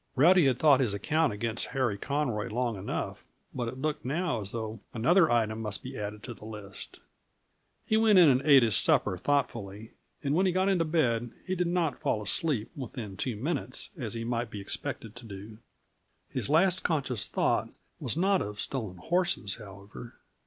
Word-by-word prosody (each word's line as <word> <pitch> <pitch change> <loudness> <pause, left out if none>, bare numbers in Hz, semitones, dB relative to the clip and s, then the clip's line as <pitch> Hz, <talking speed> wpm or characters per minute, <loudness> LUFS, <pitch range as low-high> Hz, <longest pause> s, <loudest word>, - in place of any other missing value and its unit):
Rowdy 165 +3 +6
had 130 -2 +2
thought 145 -2 +5
his 115 -7 +1
account 155 +9 +1
against 115 +2 -2
Harry 125 -6 +1
Conroy 125 -2 -1
long 120 0 -1
enough, 95 +1 -4 0.3
but 120 -2 -2
it 130 - -5
looked 150 +2 -2
now 150 -2 -1
as 100 -1 -5
though 110 -1 -4 0.2
another 165 +9 +4
item 110 -2 +1
must 105 -3 -2
be - - -7
added 105 +1 -5
to 120 - -6
the 110 - -16
list. 105 -3 -8 0.8
He 220 - +2
went 220 -2 +5
in 175 -3 +8
and 130 -2 +4
ate 140 -3 +7
his 110 -4 +2
supper - - +3
thoughtfully, 110 -7 -2 0.3
and 140 0 0
when 185 +4 +3
he - - +3
got 185 +2 +2
into 180 -4 +2
bed 120 -8 +1 0.2
he 185 - -2
did 180 -1 0
not 170 -6 0
fall - - +1
asleep 125 +1 0
within 120 -7 -6
two 120 +3 -2
minutes, 130 +2 -3
as 120 - -4
he 115 - -3
might 120 0 -2
be 105 - -7
expected 115 +2 -3
to 120 - -9
do. 105 +2 -9 0.7
His - - -4
last 180 +4 +4
conscious 135 - -1
thought - - +1 0.3
was - - -2
not 190 +2 +3
of 105 0 -5
stolen 110 -9 -4
horses, 170 - 0
however. 100 +2 -11
125 Hz, 185 wpm, -29 LUFS, 110-155 Hz, 0.8 s, in